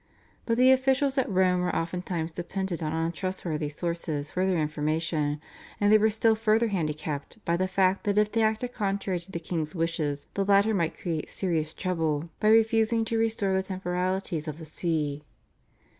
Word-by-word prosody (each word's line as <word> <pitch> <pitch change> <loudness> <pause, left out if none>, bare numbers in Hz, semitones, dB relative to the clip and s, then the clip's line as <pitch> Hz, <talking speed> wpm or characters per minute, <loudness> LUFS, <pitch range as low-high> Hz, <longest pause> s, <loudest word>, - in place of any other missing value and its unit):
But 230 -1 +1
the 255 +1 +6
officials 265 +1 +3
at 260 - 0
Rome 185 -2 +3
were 180 - -1
oftentimes 170 -1 -2
dependent 180 +1 -4
on 155 -1 -1
untrustworthy 165 -1 -2
sources 155 -2 -3
for 185 +1 0
their 185 -2 +2
information, 155 0 -1 0.4
and 205 0 +3
they 215 - +7
were 220 +1 +4
still 220 +1 +3
further 220 +1 +2
handicapped 155 -5 -3
by 170 - +2
the 185 +2 0
fact 185 0 +1
that 205 0 +1
if 210 0 +3
they 225 - +1
acted 220 +3 0
contrary 195 -3 -1
to 175 +3 -13
the 170 - -3
king's 165 0 -3
wishes 160 -4 -1
the 200 - 0
latter 200 +2 +4
might 170 -5 0
create 165 -3 -3
serious 160 -5 -1
trouble 165 -3 -2
by 215 - +1
refusing 225 +1 +4
to 225 0 0
restore 220 -4 +1
the 190 - +2
temporalities 185 -3 -2
of 155 -1 -4
the 165 - -9
See. 155 -2 -2
180 Hz, 175 wpm, -27 LUFS, 160-210 Hz, 0.4 s, they